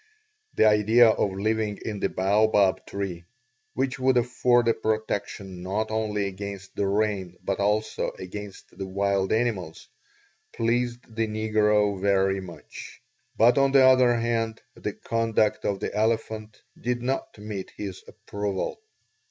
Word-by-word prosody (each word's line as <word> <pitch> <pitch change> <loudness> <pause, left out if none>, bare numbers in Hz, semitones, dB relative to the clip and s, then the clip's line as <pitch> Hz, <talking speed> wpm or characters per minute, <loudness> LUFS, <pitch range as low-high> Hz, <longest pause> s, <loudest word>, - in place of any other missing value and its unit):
The - - +4
idea 110 +2 +6
of 105 -2 +1
living 110 0 0
in 105 -2 -3
the - - 0
baobab 100 0 +2
tree, 95 -4 -5 0.5
which 130 0 -1
would 130 0 +3
afford 120 0 +2
a 115 - +5
protection 105 -4 -3
not 105 +4 -2
only 105 -2 -1
against 100 0 -7
the 100 - 0
rain 100 -3 -1
but 95 0 -2
also 105 +2 0
against 100 +2 -9
the 95 +1 -5
wild 100 0 0
animals, 110 -8 -1 0.6
pleased 120 +1 0
the 115 0 0
negro 105 -2 +1
very 95 -1 +2
much; 90 -2 -11 0.4
but 120 +5 +5
on 135 0 +3
the 135 -1 +7
other 130 -2 +6
hand 115 -1 -1
the - - -5
conduct 115 -2 0
of 100 -1 0
the - - -4
elephant 110 0 -2 0.2
did 120 0 -2
not 130 -2 -2
meet 105 -2 -6
his 100 -3 -6
approval. 100 - -4
105 Hz, 135 wpm, -26 LUFS, 100-115 Hz, 0.6 s, the